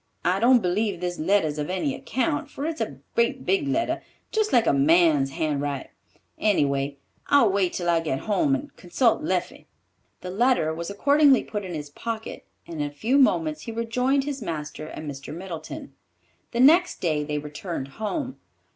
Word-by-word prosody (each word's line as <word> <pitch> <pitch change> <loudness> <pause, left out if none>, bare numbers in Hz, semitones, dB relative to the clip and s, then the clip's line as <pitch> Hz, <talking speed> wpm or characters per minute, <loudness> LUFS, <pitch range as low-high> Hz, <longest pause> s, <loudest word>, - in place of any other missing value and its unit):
I 185 +2 +2
don't 240 +1 +5
believe 190 +1 0
this 175 0 -3
letter's 160 -3 +1
of 150 - -3
any 190 +10 -1
account, 295 +4 -2
for 280 - -5
its 320 0 -3
a - - -3 0.2
great 470 0 +1
big 370 -7 +1
letter, 310 +5 0 0.3
just 435 -1 +1
like 235 -2 +4
a - - +3
man's 150 -1 +4
handwrite. 145 -4 -2 0.5
Any 205 -9 +3
way, 140 0 -2 0.3
I'll 275 -8 +5
wait 190 -2 +1
till 175 - -3
I 170 -1 +3
get 150 -5 -2
home 275 +7 +2
and 285 +1 -7
consult 230 - +1
Leffie." 310 - -2 0.5
The 180 - -6
letter 210 -6 +2
was 170 +2 -5
accordingly 280 +5 +4
put 210 -2 -5
in 180 -3 -5
his 145 -1 -6
pocket, 225 +6 -6 0.2
and 165 -3 -5
in 145 - 0
a - - -8
few 230 - +1
moments 165 - +2
he 230 - -6
rejoined 250 +4 0
his 280 -2 -4
master 155 -4 -5
and 155 - -8
Mr. 140 -1 -7
Middleton. 185 - -7 0.6
The 235 - 0
next 340 +7 +5
day 155 -4 0
they 150 0 -3
returned 150 0 -5
home. 255 - -4
190 Hz, 180 wpm, -25 LUFS, -, 0.6 s, don't